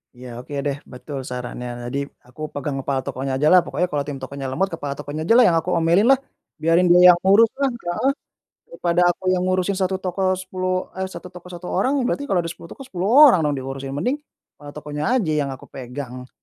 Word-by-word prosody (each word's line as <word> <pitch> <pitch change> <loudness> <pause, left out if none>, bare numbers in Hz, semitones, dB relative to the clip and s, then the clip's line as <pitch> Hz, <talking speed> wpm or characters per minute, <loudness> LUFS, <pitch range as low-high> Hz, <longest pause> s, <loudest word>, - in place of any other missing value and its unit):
Ya, 120 -1 -9
oke, 135 +3 -10
deh, 145 -1 -2
betul 135 +2 -8
sarannya 125 -1 -6
tadi 140 +3 -3 0.2
aku 130 +5 -8
pegang 140 -1 -4
kepala 135 -1 -2
tokonya 130 +1 -3
ajalah 155 +6 +5
pokoknya 180 +1 -1
kalau 145 -1 -1
tim 145 - -4
tokonya 135 0 -5
lemot 185 +9 -1
kepala 145 -4 -4
tokonya 155 +3 -6
ajalah 240 +2 +6
yang 175 -7 +4
aku 175 - -5
omelinlah, 175 +10 +4 0.4
biarin 165 +3 +2
dia 180 +1 +8
yang 175 - +1
uruslah, 230 +7 +4
heeh. 235 +1 -1 0.6
Daripada 175 +1 +1
aku 185 +1 0
yang 185 - +1
ngurusin 185 +1 +1
1 190 0 0
toko 185 0 -1
10, 185 0 -3
eee, 190 0 -4
1 180 -1 -10
toko 180 0 -12
1 180 0 -9
orang 260 +9 +1
berarti 285 +3 -2
kalau 175 -3 +1
ada 165 - -4
10 170 - -14
toko 270 - -10
10 190 -5 -3
orang 270 - +7
dong 145 - -1
diurusin, 135 +1 -5
mending, 250 - -1 0.4
eee, 145 - -9
tokonya 150 - -2
aja 180 -11 0
yang 140 - -1
aku 135 -1 -8
pegang, 125 0 -7
170 Hz, 200 wpm, -22 LUFS, 140-185 Hz, 0.6 s, dia